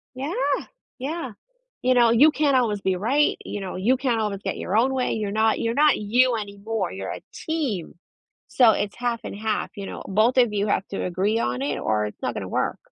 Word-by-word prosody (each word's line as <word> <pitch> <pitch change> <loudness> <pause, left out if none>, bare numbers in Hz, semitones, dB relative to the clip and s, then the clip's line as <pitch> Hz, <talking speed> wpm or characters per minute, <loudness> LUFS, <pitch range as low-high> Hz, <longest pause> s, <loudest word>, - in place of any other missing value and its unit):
Yeah, 275 +6 -4 0.7
yeah. 275 0 -4 0.5
You 255 +1 +3
know, 240 -2 +5
you 280 +7 +6
can't 295 -3 +2
always 225 -5 +2
be 190 -1 +1
right, 255 +11 +2
you 205 - -4
know, 190 -2 -5
you 225 +8 +2
can't 250 -4 0
always 205 -2 -2
get - - -3
your 195 - -1
own 260 +4 +3
way, 255 -1 0
you're 210 -2 -2
not 220 +1 +2
you're 230 0 0
not 295 +2 +4
you 240 +3 +2
anymore, 205 -1 -4
you're 95 0 -5
a - - -7
team, 270 - -3 0.5
so 245 -4 +5
it's 205 -1 -2
half 240 -1 -2
and - - -6
half, 215 0 -2
you 200 - -6
know? - - -7
Both 220 +6 +2
of 240 -4 +4
you 205 +1 0
have 200 - 0
to 195 - -3
agree 195 +5 0
on 125 - -1
it 145 +1 -2
or 105 -1 0
it's 105 - -11
not - - -2
gonna - - -4
work. - - -1
220 Hz, 220 wpm, -24 LUFS, 200-255 Hz, 0.7 s, you